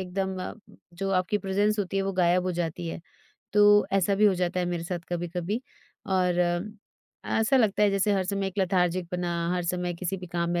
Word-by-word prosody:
एकदम, 190 +1 -3 0.6
जो 195 +2 -3
आपकी 185 +2 +1
प्रेज़ेन्स 205 +2 0
होती 195 -1 -2
है 195 - +2
वो 195 0 -2
गायब 180 0 +3
हो 185 - -1
जाती 170 0 -3
है। 165 - -5 0.5
तो 205 0 +6
ऐसा 195 0 +2
भी 210 +2 +3
हो 195 - +4
जाता 180 0 -1
है 180 - -1
मेरे 175 -1 -3
साथ 175 +1 -3
कभी-कभी। 175 +4 -3 0.5
और 180 -2 +1
अ, 175 0 +2 0.8
ऐसा 225 +5 +3
लगता 215 -4 +3
है 205 - +5
जैसे 195 +1 +2
हर 190 -2 +1
समय 195 +1 -1
एक 190 +1 -6
लेथार्जिक 180 -2 +1
पना, 180 -1 -2 0.2
हर 180 - -1
समय 175 0 -1
किसी 180 +2 -3
भी 180 -1 -8
काम 170 0 -2
में 175 - 0
185 Hz, 210 wpm, -27 LUFS, 175-195 Hz, 0.8 s, तो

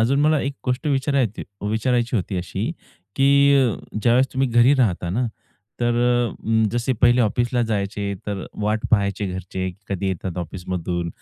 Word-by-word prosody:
अजून 135 +5 +2
मला 155 0 +3
एक 140 - -2
गोष्ट 125 +4 -1
विचारायची 135 -5 0 0.3
विचारायची 120 +2 +1
होती 95 -1 -2
अशी 95 +4 -3 0.5
की 135 - +3 0.3
अ, 125 -6 +3 0.3
ज्यावेळेस 125 +2 +4
तुम्ही 135 0 +1
घरी 120 +3 +5
राहता 105 -10 +1
ना, 115 +8 0 0.6
तर 120 0 +2
अ, 120 -1 +2 0.2
अं 110 0 +3
जसे 120 +2 0
पहिले 120 +1 +5
ऑफिसला 120 +2 +1
जायचे, 100 0 -2
तर 100 -2 -3 0.2
वाट 110 0 0
पहायचे 100 -2 +1
घरचे 95 0 -4
की - - -16 0.2
कधी 95 +1 -3
येतात 95 -1 -4
ऑफिसमधून? 90 0 -4
115 Hz, 160 wpm, -22 LUFS, 100-125 Hz, 0.6 s, घरी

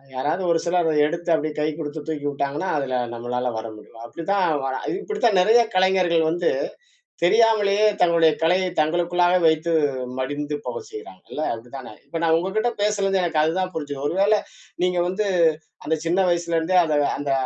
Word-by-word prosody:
யாராவது 145 +8 -1
ஒரு 165 - +2
சிலர் 175 -1 +1
அத 155 - +1
எடுத்து 170 +2 -5
அப்டியே 155 0 0
கை 150 - +1
குடுத்து 155 -1 -5
தூக்கி 150 -2 -4
உட்டாங்கன்னா, 140 +5 -3
அதுல 135 -3 -2 0.2
நம்மளால 125 +1 -3
வர 110 +1 -5
முடியும். 115 +1 -15
அப்டித்தான் 185 +8 -1 0.2
வரா 130 -1 -2
இது 370 - -2
இப்டித்தான் 245 - +1
நெறைய 220 +6 +5 0.2
கலைஞர்கள் 185 -3 +3
வந்து 175 +1 0 0.7
தெரியாமலயே 210 +1 +3 0.2
தங்களுடைய 170 -2 +4
கலையை 180 +3 +2
தங்களுக்குள்ளாவே 175 +3 +2
வைத்து 160 +2 0 0.5
மடிந்து 145 +3 -3
போகச் 125 -1 -6
செய்யுறாங்க 95 -3 -11
இல்ல! - - -4
அப்டி 115 +1 -11
தானே? 130 -4 -9
இப்ப 165 - -5
நான் 160 -1 +3
உங்ககிட்ட 205 +7 0
பேசுனதுல 200 -2 +1
எனக்கு 160 -3 +1
அதுதான் 185 +4 -1
புரிஞ்சுது. 145 -3 -5
ஒரு 145 - -2
வேளை 210 +2 +4 0.4
நீங்க 180 -1 +1
வந்து, 205 +3 -1 0.6
அந்த 160 - 0
சின்ன 170 +3 +1
வயசுல 170 -1 -1
இருந்தே 165 +3 +1
அந்த 155 -2 0 0.2
அந்த 145 -1 -3
170 Hz, 170 wpm, -22 LUFS, 145-185 Hz, 0.7 s, நெறைய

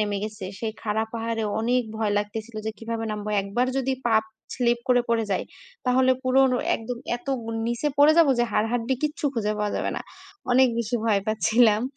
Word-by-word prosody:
নেমে 205 -1 0
গেছে, 215 -2 -6
সেই 225 -2 -3
খাড়া 220 0 0
পাহাড়ে 225 0 -2 0.2
অনেক 245 +3 +2
ভয় 215 -2 0
লাগতেছিল 215 +2 -5
যে 220 - 0
কিভাবে 225 0 -4
নামবো। 210 0 -5
একবার 220 +6 0
যদি 265 0 0 0.2
পাপ 220 -1 +3 0.3
স্লিপ 240 -1 +2
করে 245 -1 +4
পড়ে 230 -1 +2
যায় 190 - -1 0.4
তাহলে 260 +1 +4
পুরোনো 255 -1 +4 0.2
একদম 235 +2 -6 0.2
এত 240 - -20 0.4
নিচে 240 +5 0
পড়ে 295 +2 +7
যাবো 310 -5 +6
যে 240 - +4
হাড়-হাড্ডি 230 +4 +1
কিচ্ছু 300 +1 -2
খুঁজে 215 -2 0
পাওয়া 210 -1 -1
যাবে - - -1
না। - - -4 0.5
অনেক 260 0 +6
বেশি 235 +1 -1
ভয় 210 -3 +3
পাচ্ছিলাম। 220 0 +3
230 Hz, 180 wpm, -25 LUFS, 215-250 Hz, 0.5 s, পড়ে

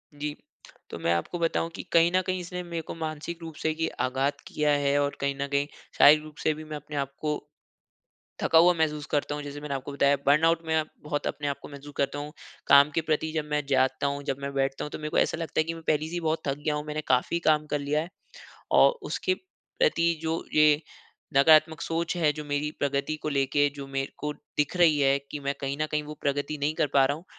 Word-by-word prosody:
जी। 145 0 -4 0.5
तो - - -6
मैं 85 - +1
आपको 85 - -2
बताऊँ 165 0 0
कि - - -6
कहीं 170 0 +5
न 185 - +4
कहीं 185 0 0
इसने 180 0 -5
मेरे 170 -1 -4
को - - -8
मानसिक 160 +1 -5
रूप 165 -2 -8
से 160 +1 -1
की 160 0 0 0.2
आघात 135 +2 -1
किया 150 -1 +1
है 145 -1 +2
और 145 0 -1
कहीं 140 0 0
न 140 - -1
कहीं 140 0 +1 0.3
शारीरिक 150 +1 +7
रूप 155 -1 -12
से 155 - +3
भी 155 +1 -9
मैं 155 0 -7
अपने 150 0 -9
आप 140 -1 -2
को 150 -1 0 1.1
थका 160 - +4
हुआ 175 +2 +6
महसूस 150 -3 -1
करता 145 0 0
हूँ 150 - -5
जैसे 145 0 -7
मैंने 145 -2 -3
आपको 135 +1 -5
बताया 140 0 +3
बर्नआउट 165 +3 +4
में 160 -1 +1 0.2
बहुत 145 -1 -2
अपने 145 - -3
आपको 140 - -4
महसूस 145 0 -11
करता 140 +1 0
हूँ। 150 +1 -7 0.3
काम 140 +1 +7
के 165 - +2
प्रति 160 0 -1
जब 155 -2 -1
मैं 150 -1 0
जागता 135 +1 +2
हूँ 140 0 -3
जब 135 -1 -2
मैं 140 0 -4
बैठता 135 0 -1
हूँ, - - -6
तो - - -5
मेरे 155 0 -4
को - - -1
ऐसा - - +2
लगता 165 -2 -3
है - - +5
की 165 +1 -4
मैं 165 0 -10
पहले 155 0 +2
से 165 - -9
ही 175 - -1
बहुत 160 -1 -1
थक 140 0 -1
गया 150 0 -1
हूँ 150 0 -4
मैंने 150 +1 -3
काफ़ी 130 +7 +2
काम 155 -1 +3
कर 150 - -1
लिया 145 +2 0
है। 165 - -7 0.6
और - - +5
उसके 370 - -1
प्रति 370 - -1
जो 165 0 -2
ये 150 -1 +5 0.6
नकारात्मक 155 +2 +6
सोच 165 +2 -2
हैं 155 -4 +3
जो 150 - -6
मेरी 145 +1 -1
प्रगति 140 +2 -1
को - - -2
लेके 145 0 +2
जो 140 -1 -7
मेरे 135 0 -3
को 150 0 -3 0.2
दिख 150 +4 0
रही 165 -4 +5
हैं 140 0 +4
की 150 - -5
मैं 140 0 -2
कहीं 135 0 -2
न 155 - +1
कहीं 150 0 0
वो 150 +1 -8
प्रगति 145 +1 -1
नहीं 145 +2 0
कर 155 - +1
पा 135 -1 +6
रहा 140 - -1
हूँ। 165 - -13
150 Hz, 245 wpm, -27 LUFS, 140-160 Hz, 1.1 s, शारीरिक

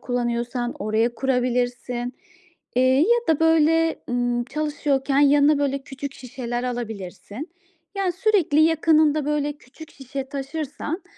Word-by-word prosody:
kullanıyorsan 240 0 -2
oraya 220 +3 0
kurabilirsin, 245 -1 -1 0.6
eee, 255 - +4 0.2
ya 475 +9 +4
da, 320 -1 +3
böyle, 325 0 +3
ımm, 245 0 0
çalışıyorken 285 -1 0
yanına, 290 +1 +5
böyle, 275 -1 0
küçük 275 +1 -7
şişeler 245 -1 -5
alabilirsin. 225 - -6 0.5
Yani, 380 -2 0
sürekli 365 -6 +2
yakınında, 315 -2 +3
böyle, 295 0 0
küçük 290 +2 -15
şişe 270 0 -7
taşırsan, 290 +4 -5
275 Hz, 115 wpm, -23 LUFS, 245-305 Hz, 0.6 s, yanına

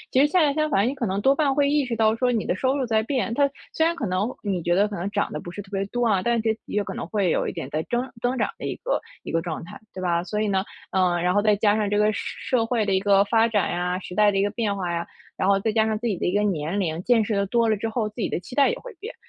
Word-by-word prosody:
其 260 - +3
实 285 - +6
恰 360 +5 +2
恰 290 - +2
相 310 0 +1
反， 200 0 +3
你 - - -1
可 250 -5 -2
能 195 +1 -1
多 270 +6 +3
半 280 -3 +2
会 280 0 +2
意 295 -1 +2
识 245 - -2
到 220 0 +2
说 250 +1 +1
你 225 -3 0
的 185 - -1
收 260 +6 +1
入 270 - 0
在 220 -2 +2
变， 250 -2 -1
它 280 +4 +3 0.2
虽 320 - +2
然 335 - +1
可 285 - -4
能 190 +3 0
你 195 -4 -1
觉 175 +1 +1
得 200 +3 +3
可 205 - -6
能 175 +3 -3
涨 205 - -1
得 - - -3
不 175 +3 -8
是 205 - -6
特 195 - -19
别 195 -1 -1
多 245 +4 -1
啊， 210 -5 +3
但 235 +2 +1
是 220 0 0
有 210 - -1
可 - - -6
能 - - -5
会 200 -2 0
有 - - +1
一 - - -3
点 130 - -6
在 155 +2 -2
增 245 +2 -1
增 245 +2 0
长 - - 0
的 - - -5
一 - - -2
个 - - -1 0.2
一 - - -7
个 165 - +1
状 165 -1 -5
态， 205 +5 -10 0.2
对 185 - -6
吧？ 170 -1 0
所 210 +3 -3
以 215 - 0
呢， 190 -1 +1 0.3
嗯， 180 -2 +1
然 180 0 +2
后 205 - +3
再 210 0 +3
加 205 0 +2
上 210 -1 0
这 205 - 0
个 210 +1 +3
社 - - -5 0.2
社 225 - +1
会 230 -2 +1
的 200 - 0
一 190 - +4
个 200 0 +4
发 225 +2 +3
展 210 -5 +1
呀， 180 +1 -1
时 180 -1 -9
代 210 -1 +5
的 - - -2
一 195 - +3
个 205 - +1
变 210 -2 -1
化 180 -3 -2
呀， 170 0 -2 0.3
然 190 - 0
后 200 0 +4
再 220 - 0
加 220 0 +3
上 220 -1 0
自 235 +2 -2
己 200 -5 -1
的 - - -1
一 180 - 0
个 205 - +3
年 180 -2 -1
龄， 165 -3 -1
见 235 -3 +4
识 210 0 -1
得 200 0 +1
多 230 +3 +2
了 215 - +2
之 225 +3 -3
后， 220 -1 -1
自 210 - -18
己 - - 0
的 - - -2
期 185 - -11
待 280 - +5
也 - - -1
会 - - -10
变。 430 +6 -8
210 Hz, 365 characters per minute, -24 LUFS, 190-235 Hz, 0.3 s, 实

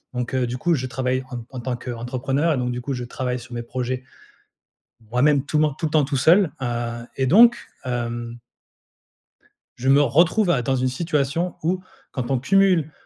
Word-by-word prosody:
Donc, 125 0 -3
heu, 125 -1 +1
du 125 +1 -4
coup, 170 +5 +1
je 130 -2 -3
travaille 130 +1 -1
en 125 - -5
t 115 - -8
en 130 - -6
tant 125 +1 -2
qu'entrepreneur 130 +6 -2
et 140 - -1
donc 125 0 -1
du 125 0 -4
coup, 135 +3 -3
je 125 -1 -4
travaille 125 0 -3
sur 120 +1 -12
mes 120 0 -4
projets, 125 +1 -3 1.1
moi-même, 140 +3 +3
tout 155 - -1
men 150 -1 +3
tout 160 - -1
le - - -3
temps 150 -1 +3
tout 140 +1 -2
seul, 165 +5 +4
heu 120 -1 -3
et 135 - +1
donc 230 - +7 0.3
hem 120 -1 -4 1.4
je 130 +2 -2
me 140 +1 +6
retrouve 170 - +3
à 135 -7 +2
dans 130 +3 0
une 130 +1 +1
situation 150 +4 -1
où, 180 +3 0 0.3
quand 130 -1 -4
on 135 - +2
cumule, 180 +1 +3
130 Hz, 200 wpm, -22 LUFS, 125-150 Hz, 1.4 s, donc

